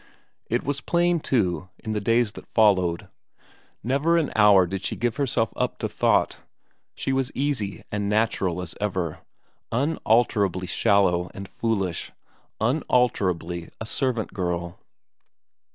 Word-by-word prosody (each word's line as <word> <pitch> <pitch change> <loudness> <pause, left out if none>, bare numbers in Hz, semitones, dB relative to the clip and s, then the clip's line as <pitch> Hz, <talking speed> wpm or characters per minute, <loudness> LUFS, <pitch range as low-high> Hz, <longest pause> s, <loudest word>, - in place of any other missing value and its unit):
It 120 +2 0
was 140 0 -2
plain, 175 0 +2
too, 95 - 0
in 110 - -6
the 105 - 0
days 115 +1 +2
that - - -12
followed; 95 -6 +2 0.8
never 140 +8 +2
an 160 -3 0
hour 105 -3 +6
did 95 +2 -5
she - - -2
give 120 0 -1
herself 125 -6 0
up - - -1
to - - -2
thought; - - +1 0.6
she 135 - -2
was 135 0 0
easy 130 -8 -2
and 105 -1 -1
natural 100 -5 0
as 85 - -6
ever, 95 -6 -2 0.5
unalterably 115 - +1
shallow 90 -2 +2
and 100 0 -7
foolish, 100 -5 -2 0.5
unalterably 100 - 0
a 110 - -5
servant 120 -1 -1
girl. 85 -2 -3
105 Hz, 130 wpm, -25 LUFS, 95-125 Hz, 0.8 s, hour